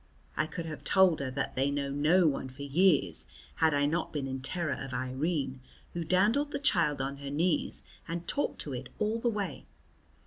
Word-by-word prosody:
I 155 - 0
could 170 0 -6
have 155 -2 -7
told 190 -4 +4
her 140 -1 -2
that 130 - -3
they 135 +2 +2
know 140 -1 -2
no 155 +6 +3
one 135 -3 0
for 130 +2 -9
years 140 - +3 0.3
had 160 -2 +3
I 145 0 +3
not 160 +3 -1
been 145 -3 -3
in 130 0 -4
terror 165 +2 -1
of 130 -1 -6
Irene, 130 +1 -2 0.3
who 170 - -3
dandled 210 - +2
the 280 - -3
child 165 - +2
on 140 +1 -4
her 140 0 -6
knees 160 +4 +2 0.2
and 170 +1 -4
talked 290 - -1
to 145 - -6
it 125 0 -6
all 215 +2 0
the 235 - +1
way. 200 - -4
150 Hz, 200 wpm, -30 LUFS, 135-180 Hz, 0.3 s, told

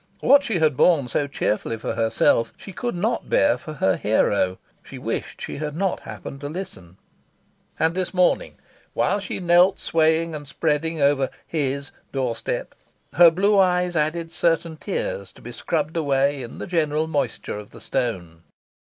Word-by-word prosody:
What 280 +1 +5
she 225 -8 -1
had 155 -4 +2
borne 150 -3 +4
so 145 +5 0
cheerfully 115 -4 -1
for 110 - -3
herself 115 0 +2
she 195 - -10
could 240 +4 -3
not 220 +7 -1
bear 290 0 +4
for 155 - -8
her 95 -10 +1
hero. 100 -3 +1 0.2
She - - -11
wished - - -4
she - - -5
had 150 0 -4
not 195 0 0
happened 140 - -9
to 145 - -4
listen. 95 - -8 0.8
And 160 +1 +2
this 185 0 -1
morning, 180 -1 +1 0.4
while 205 - +1
she 200 - -5
knelt 180 +2 +4
swaying 160 0 +1
and 145 -2 -7
spreading 160 +2 -1
over 140 -2 +3 0.2
"his" 140 -2 -2 0.2
doorstep, 125 -4 -3 0.4
her 175 -1 +8
blue 200 +5 +3
eyes 180 -1 +2
added 165 +2 -1
certain 165 -1 +1
tears - - -4
to - - -17
be - - -7
scrubbed 155 0 -2
away 140 -2 +1
in 120 -1 -8
the - - -5
general 155 -4 0
moisture 145 -8 -2
of 105 - -11
the - - -13
stone. 90 -11 -3
155 Hz, 165 wpm, -23 LUFS, 135-180 Hz, 0.8 s, her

